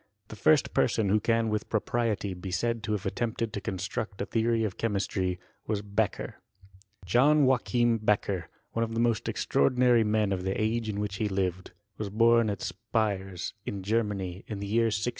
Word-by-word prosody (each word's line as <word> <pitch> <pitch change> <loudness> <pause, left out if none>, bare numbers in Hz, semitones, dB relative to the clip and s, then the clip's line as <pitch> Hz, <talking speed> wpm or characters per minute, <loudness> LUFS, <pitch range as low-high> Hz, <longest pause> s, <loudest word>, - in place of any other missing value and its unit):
The - - -8
first 145 +7 +3
person 110 -4 +2
who 105 +2 +4
can 115 +1 +1
with 105 0 -2
propriety 110 -2 0
be 90 +1 -7
said 115 +5 -1
to 105 - -1
have 105 -1 -3
attempted 115 +2 -2
to 100 - -3
construct 95 +2 -4
a 100 - -1
theory 115 +1 +1
of 105 -4 -2
che 115 - 0
mistry, 95 -3 -1 0.3
was 105 -2 -1
Beccher. 100 +1 -2 0.7
John 140 - +4
Joachim 120 -2 +2
Beccher, 100 -4 0 0.3
one 115 - -2
of 115 0 -1
the - - 0
most 115 -2 +1
extraordi 70 - +1
nary 125 -2 +5
men 105 -1 +1
of 90 - -2
the 95 +1 -2
age 110 +1 0
in 100 -1 -2
which 100 -1 -3
he 105 0 0
lived, 95 -2 -2 0.3
was 105 -2 -3
bom 115 +2 +4
at; 100 - -3
Spires, 100 -5 -2
in 100 -2 -5
Gennaay, 100 -4 -1
ia 110 - -3
the 100 0 -5
year 115 +3 +2
1635. 110 0 0
105 Hz, 190 wpm, -28 LUFS, 100-115 Hz, 0.7 s, nary